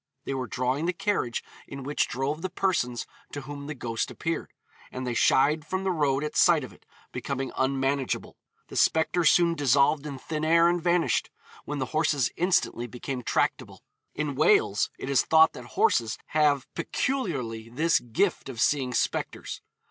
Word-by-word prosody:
They -, -, -2 dB
were 130 Hz, -2 st, -3 dB
drawing 130 Hz, +7 st, -1 dB
the 180 Hz, -, +1 dB
carriage 170 Hz, -, -1 dB, 0.2 s
in 140 Hz, -1 st, -8 dB
which 145 Hz, +3 st, 0 dB
drove 135 Hz, +5 st, -2 dB
the 185 Hz, -, -3 dB
persons 135 Hz, -12 st, -1 dB, 0.3 s
to 145 Hz, -, -4 dB
whom 140 Hz, +1 st, -8 dB
the 150 Hz, -, -5 dB
ghost 115 Hz, -3 st, -3 dB
appeared, 165 Hz, 0 st, -4 dB, 0.4 s
and 130 Hz, 0 st, -5 dB
they 125 Hz, -, -2 dB
shied 150 Hz, +6 st, +3 dB
from 190 Hz, +5 st, -3 dB
the 190 Hz, -, +1 dB
road 145 Hz, -4 st, +1 dB
at 150 Hz, -, -4 dB
sight 170 Hz, -5 st, +5 dB
of 130 Hz, -, -9 dB
it, -, -, -23 dB, 0.2 s
becoming 135 Hz, -1 st, -4 dB
unmanageable. 135 Hz, 0 st, -1 dB, 0.3 s
The -, -, -6 dB
spectre 160 Hz, +2 st, +2 dB
soon 170 Hz, +2 st, +5 dB
dissolved 145 Hz, +1 st, +2 dB
in 140 Hz, -2 st, -6 dB
thin 155 Hz, +3 st, -4 dB
air 165 Hz, +1 st, +5 dB
and 175 Hz, 0 st, +1 dB
vanished, 175 Hz, 0 st, +1 dB, 0.4 s
when 145 Hz, -, -4 dB
the 130 Hz, -, -1 dB
horses 150 Hz, -5 st, +1 dB
instantly 175 Hz, -9 st, +1 dB
became 125 Hz, +1 st, -5 dB
tractable. -, -, -1 dB, 0.3 s
In 150 Hz, -1 st, -2 dB
Wales 415 Hz, -, +3 dB
it -, -, -6 dB
is 135 Hz, -2 st, +3 dB
thought 160 Hz, 0 st, +5 dB
that 120 Hz, -, -9 dB
horses 115 Hz, -2 st, +2 dB
have 145 Hz, -3 st, +2 dB
peculiarly 140 Hz, -, -2 dB
this 155 Hz, +7 st, +2 dB
'gift' 135 Hz, -, -1 dB
of 120 Hz, -4 st, -7 dB
seeing 130 Hz, -3 st, +1 dB
spectres. -, -, -2 dB
145 Hz, 170 wpm, -27 LUFS, 130-165 Hz, 0.4 s, sight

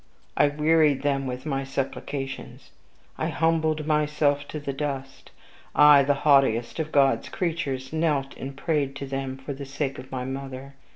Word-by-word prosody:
I 145 Hz, -, +5 dB
wearied 150 Hz, -1 st, +3 dB
them 135 Hz, -2 st, 0 dB
with 125 Hz, +2 st, -5 dB
my 135 Hz, -3 st, -1 dB
supplications. 135 Hz, 0 st, -5 dB, 0.5 s
I -, -, 0 dB
humbled 160 Hz, -2 st, +1 dB
myself 150 Hz, -1 st, +1 dB
to 155 Hz, -, -5 dB
the 140 Hz, -1 st, -4 dB
dust; 135 Hz, -1 st, -5 dB, 0.5 s
I, 150 Hz, -1 st, +8 dB
the 140 Hz, +1 st, +2 dB
haughtiest 135 Hz, -3 st, +3 dB
of 155 Hz, -1 st, -2 dB
God's 135 Hz, -2 st, +3 dB
creatures, 155 Hz, -6 st, -3 dB
knelt 150 Hz, -4 st, 0 dB
and 135 Hz, +1 st, -7 dB
prayed 145 Hz, -3 st, -1 dB
to 140 Hz, -, -5 dB
them 135 Hz, -1 st, -4 dB
for 135 Hz, +2 st, -6 dB
the 140 Hz, +1 st, -7 dB
sake 140 Hz, 0 st, -3 dB
of 130 Hz, -, -11 dB
my 125 Hz, -1 st, -3 dB
mother. 135 Hz, 0 st, -6 dB
140 Hz, 160 wpm, -25 LUFS, 135-150 Hz, 0.5 s, I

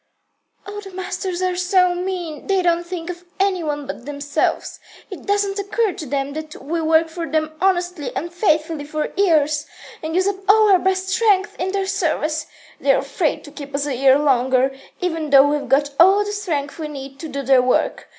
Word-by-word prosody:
"All 415 Hz, +1 st, -7 dB
the 395 Hz, -, -10 dB
masters 370 Hz, -1 st, -4 dB
are 365 Hz, -1 st, 0 dB
so 365 Hz, 0 st, +3 dB
mean. 355 Hz, -4 st, -4 dB
They 385 Hz, -2 st, +2 dB
don't 345 Hz, 0 st, +1 dB
think 350 Hz, -1 st, -4 dB
of 350 Hz, 0 st, -11 dB, 0.2 s
any 385 Hz, -2 st, +1 dB
one 295 Hz, -2 st, -3 dB
but 245 Hz, 0 st, -8 dB
themselves. 285 Hz, 0 st, -2 dB, 0.3 s
It -, -, -9 dB
doesn't 405 Hz, 0 st, 0 dB
occur 400 Hz, +1 st, 0 dB
to 310 Hz, -, -7 dB
them 275 Hz, +1 st, -2 dB
that 310 Hz, 0 st, -7 dB
we 325 Hz, +4 st, -3 dB
work 320 Hz, +1 st, +3 dB
for 330 Hz, 0 st, -6 dB
them 310 Hz, 0 st, 0 dB
honestly 355 Hz, -5 st, 0 dB
and 340 Hz, +3 st, -4 dB
faithfully 315 Hz, -4 st, +1 dB
for 305 Hz, +1 st, -3 dB
years, 310 Hz, -6 st, +2 dB, 0.3 s
and 320 Hz, +1 st, -4 dB
use 375 Hz, +1 st, +2 dB
up 400 Hz, -1 st, 0 dB
our 415 Hz, -3 st, +6 dB
best 380 Hz, +1 st, 0 dB
strength 400 Hz, -2 st, +2 dB
in 375 Hz, +1 st, -1 dB
their 390 Hz, 0 st, -1 dB
service. 315 Hz, -5 st, -1 dB, 0.3 s
They're -, -, +3 dB
afraid -, -, -1 dB
to 290 Hz, -, -12 dB
keep 285 Hz, -1 st, -8 dB
us 280 Hz, 0 st, -1 dB
a 290 Hz, -, -2 dB
year 265 Hz, +1 st, +5 dB
longer, 265 Hz, -2 st, +2 dB, 0.3 s
even 325 Hz, -4 st, -2 dB
though 275 Hz, 0 st, +7 dB
we've 295 Hz, 0 st, -1 dB
got 285 Hz, +1 st, +2 dB
all 390 Hz, +4 st, +6 dB
the 415 Hz, -, -3 dB
strength 330 Hz, -8 st, -3 dB
we 310 Hz, -, -3 dB
need 275 Hz, -2 st, -9 dB
to 325 Hz, -, -6 dB
do 280 Hz, -1 st, -4 dB
their 265 Hz, -1 st, +5 dB
work. 250 Hz, 0 st, 0 dB
330 Hz, 195 wpm, -20 LUFS, 290-375 Hz, 0.3 s, though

